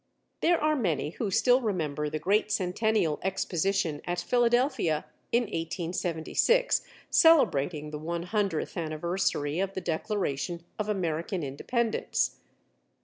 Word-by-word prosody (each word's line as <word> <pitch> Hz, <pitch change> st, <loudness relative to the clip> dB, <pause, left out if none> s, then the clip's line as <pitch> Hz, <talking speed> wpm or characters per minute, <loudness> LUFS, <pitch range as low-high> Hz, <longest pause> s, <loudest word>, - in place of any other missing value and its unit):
There 340 Hz, 0 st, +3 dB
are 305 Hz, 0 st, +2 dB
many 165 Hz, -, 0 dB
who 215 Hz, +3 st, -3 dB
still 245 Hz, +5 st, +4 dB
remember 155 Hz, -, -1 dB
the 155 Hz, -, -2 dB
great 200 Hz, +7 st, +1 dB
Centennial 190 Hz, -3 st, +1 dB
Exposition 190 Hz, -4 st, -1 dB
at 175 Hz, 0 st, -2 dB
Philadelphia 240 Hz, -, +2 dB, 0.3 s
in 240 Hz, +1 st, +3 dB
1876, 175 Hz, -, 0 dB, 0.3 s
celebrating 150 Hz, -, +4 dB
the 150 Hz, -, -5 dB
one 170 Hz, +2 st, -3 dB
hundredth 195 Hz, -3 st, -1 dB
anniversary 160 Hz, -1 st, -1 dB
of 195 Hz, 0 st, -1 dB
the 190 Hz, -, -2 dB
declaration 170 Hz, -3 st, -2 dB, 0.2 s
of 210 Hz, 0 st, -2 dB
American 170 Hz, -2 st, -1 dB
Independence. 225 Hz, -, -1 dB
180 Hz, 115 wpm, -28 LUFS, 155-220 Hz, 0.3 s, still